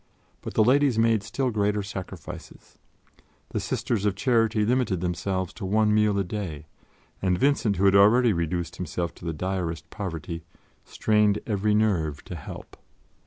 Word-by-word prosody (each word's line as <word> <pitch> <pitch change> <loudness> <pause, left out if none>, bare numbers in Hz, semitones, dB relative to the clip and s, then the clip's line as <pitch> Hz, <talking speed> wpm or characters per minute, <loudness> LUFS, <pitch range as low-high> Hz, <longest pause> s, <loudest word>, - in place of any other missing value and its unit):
But - - -7
the 110 - +5
Ladies 135 +1 +3
made 115 -2 +3
still 130 +4 -2
greater 105 -1 0
sacrifices; 95 -2 -9 0.7
the - - -2
Sisters 110 -4 -2
of 105 -2 +1
Charity 115 -1 +2
limited 120 -6 +1
themselves 90 +1 -2
to - - -9
one 105 +2 +2
meal 105 -1 +3
a 100 - +2
day, 90 -6 -5 0.6
and 90 -2 +1
Vincent, 125 -4 +2
who 95 - +1
had 95 - +5
already 110 +4 +6
reduced 85 0 -2
himself 85 -1 -3
to - - -13
the 80 - -1
direst 85 -2 -3
poverty, 85 -5 -5 0.4
strained 105 -1 +2
every 105 -1 +1
nerve 85 -9 +1
to 90 - -7
help. 75 - -9
100 Hz, 155 wpm, -26 LUFS, 90-110 Hz, 0.7 s, already